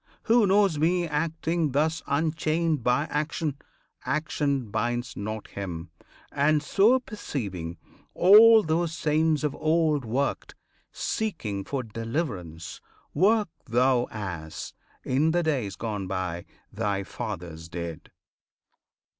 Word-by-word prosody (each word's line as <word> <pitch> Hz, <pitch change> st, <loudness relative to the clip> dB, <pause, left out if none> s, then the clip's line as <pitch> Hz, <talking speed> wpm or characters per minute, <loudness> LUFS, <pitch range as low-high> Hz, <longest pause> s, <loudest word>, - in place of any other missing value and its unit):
[FN#7] -, -, -40 dB, 0.2 s
Who 230 Hz, -2 st, +4 dB
knows 195 Hz, -5 st, +3 dB
me 175 Hz, +2 st, +2 dB
acting 160 Hz, 0 st, -1 dB
thus 160 Hz, +3 st, +1 dB
Unchained 155 Hz, +1 st, 0 dB
by 125 Hz, +4 st, +2 dB
action, 150 Hz, 0 st, -1 dB, 0.5 s
action 140 Hz, -6 st, -1 dB
binds 120 Hz, +3 st, -2 dB
not 110 Hz, +1 st, -5 dB
him; 85 Hz, -4 st, -6 dB, 0.4 s
And, 150 Hz, +1 st, +2 dB
so 210 Hz, +11 st, +4 dB
perceiving, 100 Hz, -, -5 dB, 0.4 s
all 220 Hz, +4 st, +8 dB
those 165 Hz, +1 st, 0 dB
saints 155 Hz, 0 st, +1 dB
of 150 Hz, -2 st, 0 dB
old 155 Hz, -3 st, +1 dB
Worked, 125 Hz, +5 st, -2 dB, 0.4 s
seeking 115 Hz, -, -3 dB
for 135 Hz, +4 st, -3 dB
deliverance. 110 Hz, -, -4 dB, 0.3 s
Work 210 Hz, 0 st, +3 dB, 0.2 s
thou 125 Hz, +1 st, +3 dB
As, 90 Hz, -7 st, -6 dB, 0.3 s
in 145 Hz, +5 st, +2 dB
the 175 Hz, 0 st, +2 dB
days 130 Hz, -, -1 dB
gone 105 Hz, 0 st, -4 dB
by, 90 Hz, -2 st, -3 dB, 0.3 s
thy 100 Hz, -2 st, -1 dB
fathers 80 Hz, -3 st, -6 dB
did. 85 Hz, -2 st, -6 dB
140 Hz, 115 wpm, -26 LUFS, 105-160 Hz, 0.5 s, all